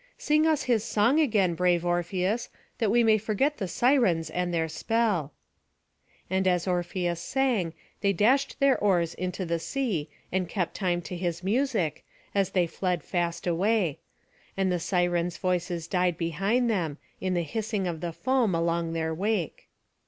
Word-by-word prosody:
Sing 305 +1 +2
us 310 -2 +2
his 235 -4 +1
song 230 +5 +2
again, 210 - +3
brave 175 0 +1
Orpheus, 180 +6 0 0.3
that 220 - +2
we 235 +3 +4
may 220 -1 +4
forget 230 +8 0
the 195 - -3
Sirens 180 - +2
and 180 +1 -1
their 165 -1 0
spell." 200 -3 0 1.0
And 190 +1 0
as 180 0 +1
Orpheus 175 -1 -1
sang, 240 -11 0 0.2
they 200 -1 +2
dashed 235 +9 +2
their 275 -1 +5
oars 175 -5 +2
into 185 +1 -3
the 170 0 -1
sea, 190 - -2 0.2
and 185 -2 -1
kept 180 -3 -2
time 175 -3 -1
to 180 - -6
his 175 -1 -3
music, 215 - 0 0.3
as 195 -2 +2
they 180 -2 +2
fled 180 +1 -2
fast 170 -2 -2
away; 180 -1 +1 0.6
and 190 -1 +1
the 180 - 0
Sirens' 175 -1 0
voices 175 -2 -1
died 180 -2 +1
behind 195 +9 0
them, 170 -10 -1 0.2
in 185 -1 -1
the 175 - +1
hissing 210 +4 -2
of 170 -3 -3
the 175 -1 -3
foam 240 0 +1
along 165 0 0
their 160 -1 -1
wake. 195 0 -2
185 Hz, 160 wpm, -27 LUFS, 170-220 Hz, 1.0 s, their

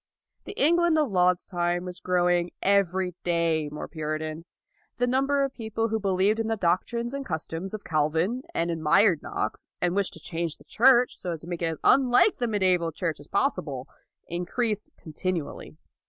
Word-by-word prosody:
The - - -6
England 340 +2 +4
of 295 -7 +1
Laud's 180 -1 +2
time 175 -1 -1
was 180 0 -6
grow 180 -1 +1
ing 175 0 +2
every 190 -2 +2
day 165 -3 +1
more 150 - -6
Puritan. 155 +1 -4 0.5
The 245 - +2
number 275 +3 +2
of 275 -1 -2
people 225 0 -2
who 220 0 0
believed 195 +2 +1
in 225 - -1
the 225 0 -1
doctrines 235 +7 0
and 275 0 -3
customs 170 0 -4
of 210 - -8
Calvin, 160 +9 0
and 170 +1 0
admired 165 +2 +3
Knox, 110 - -4
and 175 +1 0
wished 200 -1 0
to - - -10
change 165 -2 -4
the - - -19
Church 250 +1 +4
so 180 - -6
as 160 - -7
to 165 - -11
make 175 -1 -4
it 165 - +1
as 160 -1 -3
unlike 265 - +4
the 240 - 0
Mediaeval 185 -6 +1
Church 165 -2 -3
as 145 - -13
possible, 150 - -1 0.4
increased 210 +5 -2
continually. 160 -1 -5
180 Hz, 180 wpm, -26 LUFS, 165-225 Hz, 0.5 s, England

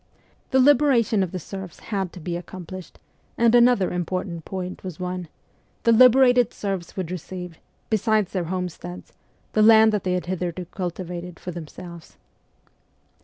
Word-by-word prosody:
The 265 - +3
liberation 255 -6 +4
of 185 -3 -1
the 185 - -4
serfs 190 0 -8
had 190 -3 -1
to - - -9
be 170 +1 -4
accomplished; 180 +1 -8 0.4
and 230 0 +4
another 240 -5 +5
important 175 -1 -3
point 185 -1 -6
was 185 -3 -7
won 180 -1 -4 0.6
the 230 - +4
liberated 250 0 +6
serfs 195 -4 -4
would 180 -3 -3
receive, 180 -1 -7 0.3
besides 215 -2 +2
their 180 -3 -2
homesteads, 180 0 -6 0.4
the 215 - +3
land 220 0 +7
that 210 -3 -1
they 185 - 0
had 180 -3 -1
hitherto 180 0 -3
cultivated 180 -1 -6
for 180 - -6
themselves. 170 0 -10
185 Hz, 145 wpm, -24 LUFS, 175-220 Hz, 0.6 s, land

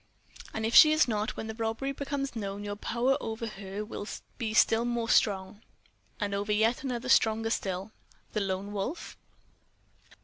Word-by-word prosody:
"And 220 - -3
if 225 - -1
she 305 - +9
is 310 -2 +4
not, 215 -2 -2
when - - -4
the 220 - -5
robbery 225 +4 -2
becomes 275 -1 -3
known, 200 -2 -4
your 205 0 -4
power 245 +6 0
over 225 +1 -4
her 200 -1 -6
will 210 -1 -6 0.3
be 225 -3 -2
still 225 +1 +4
more 240 -1 -1
strong?" 195 0 +2 0.6
"And 205 -1 -2
over 200 +1 -1
yet 220 +3 +2
another 255 -2 -3
stronger 225 -3 +3
still." 190 0 -2 0.4
"The 215 - 0
Lone 195 +1 -3
Wolf?" 210 - -4
220 Hz, 165 wpm, -29 LUFS, 205-240 Hz, 0.6 s, she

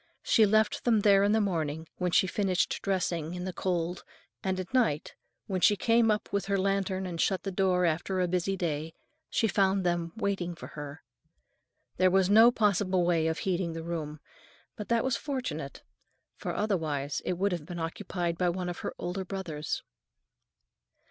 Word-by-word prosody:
She 220 -2 +5
left 215 +1 +2
them 225 -3 +3
there 200 -1 +5
in 205 - +3
the 220 - +3
morning, 160 -6 -1
when 180 -1 0
she 190 - +4
finished 190 0 0
dressing 175 -4 -1
in 180 - -5
the 185 - -4
cold, 175 -1 -2 0.4
and 190 -1 -1
at 185 +5 -6
night, 220 - +1 0.3
when 185 -3 -2
she 205 - +6
came 230 +2 +3
up 210 -1 -1
with 200 - 0
her 200 0 +1
lantern 195 -1 0
and 170 -2 -3
shut 190 -2 +1
the 195 - -3
door 185 -1 +2
after 175 +3 0
a 180 - +2
busy 185 +2 0
day, 160 -2 -3 0.3
she 225 - +1
found 195 -1 +2
them 175 -1 0
awaiting 190 -5 -2
her. 145 +1 -8 0.9
There 185 0 +5
was 190 +1 +3
no 225 +3 +8
possible 200 -5 +2
way 165 -2 +2
of 160 0 -1
heating 180 -3 -1
the 165 0 -5
room, 155 -3 -4 0.6
but 210 - -7
that 235 -1 +2
was 260 -2 0
fortunate, 270 -4 -4 0.5
for - - -4
otherwise 155 -9 -1
it - - -1
would 195 +3 0
have 170 -4 -4
been 175 - -6
occupied 170 0 -3
by 180 -1 +3
one 180 0 -2
of 175 - -5
her - - -5
older 180 +2 -3
brothers. 175 -6 -4
185 Hz, 180 wpm, -29 LUFS, 170-200 Hz, 0.9 s, no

